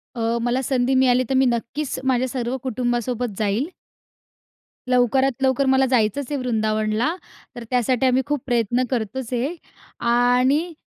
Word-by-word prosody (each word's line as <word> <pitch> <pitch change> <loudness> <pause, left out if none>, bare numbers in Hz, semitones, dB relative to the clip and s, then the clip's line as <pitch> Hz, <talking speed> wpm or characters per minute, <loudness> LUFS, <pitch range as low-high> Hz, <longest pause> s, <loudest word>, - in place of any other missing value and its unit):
अ, 230 0 0
मला 245 +2 0
संधी 260 0 +1
मिळाली 255 -1 +4
तर - - +1
मी 265 0 +4
नक्कीचं, 245 +4 -2
माझ्या 260 0 +1
सर्व 245 0 -3
कुटुंबासोबत 240 -2 -2
जाईल. 215 +7 0 1.2
लवकरात 255 +1 +2
लवकर 265 +1 +2
मला 265 0 +4
जायचचं 240 -1 +1
आहे 290 - -1
वृंदावनला, 220 +3 0 0.4
तर 240 - -7
त्यासाठी 250 +1 +1
आम्ही 255 +1 +3
खूप 290 -3 -2
प्रयत्न 240 0 +1
करतोचं 245 +1 -3
आहे, 270 +8 -2 0.5
आणि 250 +7 +2
250 Hz, 140 wpm, -22 LUFS, 235-265 Hz, 1.2 s, मिळाली